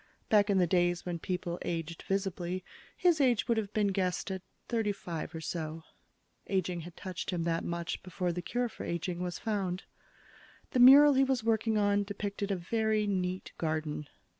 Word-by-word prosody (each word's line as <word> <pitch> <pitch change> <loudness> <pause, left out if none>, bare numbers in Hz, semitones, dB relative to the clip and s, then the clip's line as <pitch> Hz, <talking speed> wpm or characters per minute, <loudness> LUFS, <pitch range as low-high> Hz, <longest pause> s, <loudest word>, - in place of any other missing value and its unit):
Back 210 -1 +5
in 200 - +3
the 180 - +5
days 175 0 +1
when 175 -2 -3
people 175 0 -3
aged 165 -1 -3
visibly, 185 -2 -2 0.3
his 340 -4 +3
age 250 -4 +3
would 235 -2 +2
have 210 -2 -2
been 210 -2 +2
guessed 185 -1 -1
at 190 -1 -4 0.3
thirty 225 -3 +1
five 170 -4 -6
or 160 - -5
so. 160 0 -4 0.6
Aging 180 -3 -1
had 175 +1 -11
touched 185 -2 -5
him 175 -3 -1
that 165 0 0
much 170 0 -3
before 180 -1 -2
the 180 - -3
cure 245 +7 -1
for - - -9
aging 170 +1 -3
was 180 -1 -3
found. 195 -4 -2 0.9
The 255 - +1
mural 280 +4 +9
he 270 0 +4
was 265 -4 +1
working 220 -1 +2
on 205 -1 +3
depicted 200 0 -4
a 200 - +1
very 215 +3 0
neat 185 -2 -2
garden. 155 -2 -2
185 Hz, 180 wpm, -31 LUFS, 175-215 Hz, 0.9 s, mural